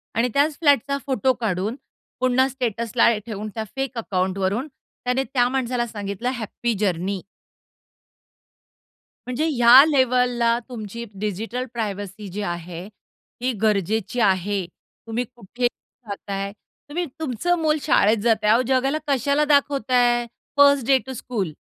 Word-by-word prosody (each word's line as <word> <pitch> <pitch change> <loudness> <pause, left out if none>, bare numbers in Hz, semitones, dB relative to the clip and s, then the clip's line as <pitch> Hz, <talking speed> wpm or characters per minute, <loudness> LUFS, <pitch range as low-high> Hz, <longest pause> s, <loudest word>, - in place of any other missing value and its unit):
आणि 235 +2 +2
त्याच 290 +1 +2
फ्लॅटचा 280 -3 +3
फोटो 265 -1 +1
काढून, 215 -2 -2 0.4
पुन्हा 255 +1 +3
स्टेटसला 235 -2 +1 0.2
ठेवून, 215 -2 -5
त्या 220 - -2
फेक 270 -2 -3
अकाउंटवरून 190 +3 -1 0.4
त्याने 250 +2 +1
त्या 250 -2 +1
माणसाला 250 -2 -1
सांगितलं 205 +1 -4
हॅपी 235 +1 -3
जर्नी. 190 -1 -1 2.1
म्हणजे 250 +5 -1
ह्या 245 -1 +8
लेव्हलला 250 -4 +2
तुमची 230 -1 -6 0.2
डिजिटल 220 +5 -3
प्रायव्हसी 205 -2 -4
जी 205 +3 -4
आहे 175 -1 -5
ती 245 +4 -7
गरजेची 215 +2 0
आहे. 195 -2 +1
तुम्ही 225 +6 -7
कुठे 245 +2 -2
जाताय? 200 -5 -7 0.4
तुम्ही 345 +4 -2
तुमचं 320 +4 0
मुल 310 -1 +2
शाळेत 225 -7 +3
जात 230 -1 +4
आहे. 210 +1 +5
अहो, 235 - +4
जगाला 265 +3 +2
कशाला 280 +2 +2
दाखवताय 255 -4 +2 0.3
फर्स्ट 280 -3 +6
डे 270 -1 +6
टू 265 - -6
स्कूल? 220 -8 -3
240 Hz, 125 wpm, -23 LUFS, 205-260 Hz, 2.1 s, ह्या